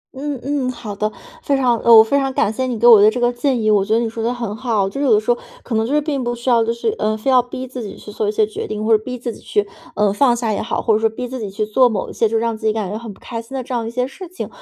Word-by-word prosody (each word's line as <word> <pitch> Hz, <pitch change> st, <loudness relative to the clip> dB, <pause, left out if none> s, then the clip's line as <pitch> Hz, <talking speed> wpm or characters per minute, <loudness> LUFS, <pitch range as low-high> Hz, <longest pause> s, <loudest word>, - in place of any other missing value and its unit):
嗯 280 Hz, 0 st, -4 dB
嗯， 275 Hz, -2 st, -1 dB
好 220 Hz, -4 st, -7 dB
的。 215 Hz, +1 st, -1 dB, 0.3 s
非 280 Hz, -, +1 dB
常 245 Hz, -3 st, +1 dB
我 230 Hz, -2 st, +9 dB
非 280 Hz, +6 st, +1 dB
常 270 Hz, -1 st, -1 dB
感 215 Hz, -, +1 dB
谢 260 Hz, +3 st, -2 dB
你 245 Hz, -2 st, -2 dB
给 235 Hz, -, 0 dB
我 230 Hz, -4 st, +9 dB
的 210 Hz, -, +7 dB
这 245 Hz, -, -3 dB
个 245 Hz, 0 st, +2 dB
建 255 Hz, +1 st, 0 dB
议， 215 Hz, -, +2 dB
我 205 Hz, -2 st, +3 dB
觉 215 Hz, +2 st, -1 dB
得 230 Hz, -, +3 dB
你 235 Hz, -, 0 dB
说 225 Hz, 0 st, -5 dB
得 235 Hz, -, +1 dB
很 235 Hz, -4 st, -4 dB
好。 220 Hz, -5 st, 0 dB
就 275 Hz, +8 st, -5 dB
是 285 Hz, -, +1 dB
有 245 Hz, -, +3 dB
的 210 Hz, -, +5 dB
时 215 Hz, +3 st, 0 dB
候 240 Hz, -, -7 dB, 0.3 s
可 245 Hz, -, -6 dB
能 220 Hz, 0 st, +1 dB
就 -, -, -4 dB
是 300 Hz, -, +4 dB
并 285 Hz, -3 st, -2 dB
不 240 Hz, 0 st, -2 dB
需 240 Hz, +2 st, -3 dB
要 230 Hz, -1 st, +4 dB
就 225 Hz, -, 0 dB
是 235 Hz, -, -2 dB
呃， 215 Hz, 0 st, 0 dB
非 240 Hz, +5 st, 0 dB
要 255 Hz, -1 st, +6 dB
逼 245 Hz, +1 st, -7 dB
自 255 Hz, 0 st, -7 dB
己 210 Hz, -, -7 dB
去 210 Hz, -, -11 dB
做 210 Hz, 0 st, -1 dB
一 -, -, +1 dB
些 215 Hz, 0 st, +2 dB
决 215 Hz, -, -6 dB
定， 215 Hz, 0 st, -4 dB
或 225 Hz, 0 st, +5 dB
者 215 Hz, -, -1 dB
逼 250 Hz, +1 st, -5 dB
自 240 Hz, -1 st, -5 dB
己 -, -, -13 dB
去， 205 Hz, 0 st, -1 dB, 0.3 s
呃， 205 Hz, -1 st, +2 dB
放 245 Hz, +2 st, +3 dB
下 230 Hz, -2 st, -1 dB
也 -, -, -2 dB
好， 220 Hz, -, -2 dB
或 225 Hz, -, +3 dB
者 215 Hz, -, +2 dB
说 225 Hz, -, +2 dB
逼 245 Hz, +3 st, -6 dB
自 255 Hz, +1 st, -6 dB
己 210 Hz, -3 st, -4 dB
去 215 Hz, +2 st, -2 dB
做 245 Hz, +4 st, +4 dB
某 210 Hz, -4 st, -3 dB
些 225 Hz, -, +1 dB
就 225 Hz, -, 0 dB
让 230 Hz, 0 st, -1 dB
自 220 Hz, 0 st, -3 dB
己 215 Hz, -, +2 dB
感 210 Hz, -4 st, -3 dB
觉 210 Hz, -, -3 dB
很 230 Hz, -1 st, -8 dB
不 -, -, -15 dB
开 230 Hz, -2 st, -6 dB
心 230 Hz, +4 st, -10 dB
的 260 Hz, -, -3 dB
这 255 Hz, -, -7 dB
样 230 Hz, -2 st, -2 dB
一 -, -, -3 dB
些 250 Hz, +2 st, -1 dB
事 355 Hz, +8 st, -9 dB
情。 365 Hz, -, -6 dB
230 Hz, 380 characters per minute, -19 LUFS, 215-255 Hz, 0.3 s, 我